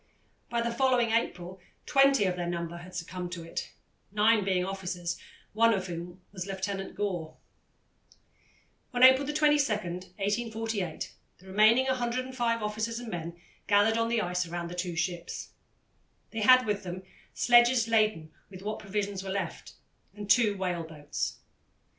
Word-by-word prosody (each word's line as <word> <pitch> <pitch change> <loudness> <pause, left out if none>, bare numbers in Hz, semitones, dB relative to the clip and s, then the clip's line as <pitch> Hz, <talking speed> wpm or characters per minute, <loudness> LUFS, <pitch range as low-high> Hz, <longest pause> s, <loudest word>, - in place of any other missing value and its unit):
By 235 -1 0
the 235 0 -1
following 245 -2 +2
April 185 -5 -1 0.3
twenty 275 -3 +4
of 180 -1 0
their 175 -1 -3
number 170 0 -4
had 180 +1 -11
succumbed 180 +1 -5
to 170 -2 -6
it, 165 - -5 0.4
nine 210 +1 +4
being 185 -2 +1
officers, 180 -3 -3 0.4
one 230 +1 +4
of 190 -1 -3
whom 175 +1 -7
was 185 -1 -6
Lieutenant 195 0 -4
Gore. 180 -6 -3 1.6
On 245 - +3
April 260 +2 +7
22, 295 -3 +3
1848, 205 +1 -3 0.2
the 185 - -20
remaining 215 +6 +4
105 245 -2 -1
officers 220 +2 -2
and 240 -1 -6
men 170 -1 -5 0.3
gathered 210 +3 +4
on 230 0 +1
the 230 -2 +1
ice 180 0 -1
around 170 0 -4
the - - -7
two 180 -1 -3
ships. 170 +1 -3 0.8
They 225 - -3
had 255 +3 +7
with 210 -2 -1
them 185 0 -6 0.3
sledges 240 -1 +5
laden 215 -8 +1 0.2
with 190 -1 -11
what 215 +1 -3
provisions 200 -1 -3
were 195 - -6
left, 190 -3 -4 0.4
and 205 -1 -7
two 210 -2 +4
whale 180 -2 -1
boats. 150 -2 -4
200 Hz, 145 wpm, -29 LUFS, 180-230 Hz, 1.6 s, April